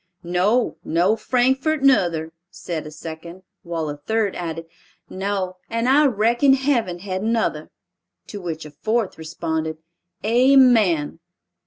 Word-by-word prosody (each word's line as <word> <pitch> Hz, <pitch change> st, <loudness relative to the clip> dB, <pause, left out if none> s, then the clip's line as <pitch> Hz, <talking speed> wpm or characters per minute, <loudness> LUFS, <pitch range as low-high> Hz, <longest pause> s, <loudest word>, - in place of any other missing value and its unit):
"No, 185 Hz, +8 st, +1 dB
nor 175 Hz, +6 st, +2 dB
Frankfort 265 Hz, +6 st, +1 dB
nuther," 170 Hz, -11 st, +2 dB, 0.2 s
said 160 Hz, -5 st, -6 dB
a -, -, -9 dB
second. 165 Hz, +3 st, -9 dB, 0.2 s
While 165 Hz, -2 st, -4 dB
a 145 Hz, 0 st, -5 dB
third 215 Hz, +6 st, -1 dB
added, 165 Hz, -1 st, -5 dB, 0.5 s
"No, 190 Hz, -1 st, -3 dB
and 230 Hz, +1 st, -1 dB
I 285 Hz, +3 st, +5 dB
reckon 240 Hz, +4 st, +3 dB
heaven 255 Hz, -10 st, 0 dB
hadn't 190 Hz, +4 st, -3 dB
nuther!" 230 Hz, -1 st, -1 dB, 0.6 s
To 205 Hz, -, -7 dB
which 160 Hz, -3 st, -5 dB
a 150 Hz, -, -10 dB
fourth 220 Hz, +2 st, -2 dB
responded, 160 Hz, -1 st, -3 dB, 0.5 s
"Amen." 230 Hz, -, +4 dB
190 Hz, 125 wpm, -22 LUFS, 165-235 Hz, 0.6 s, I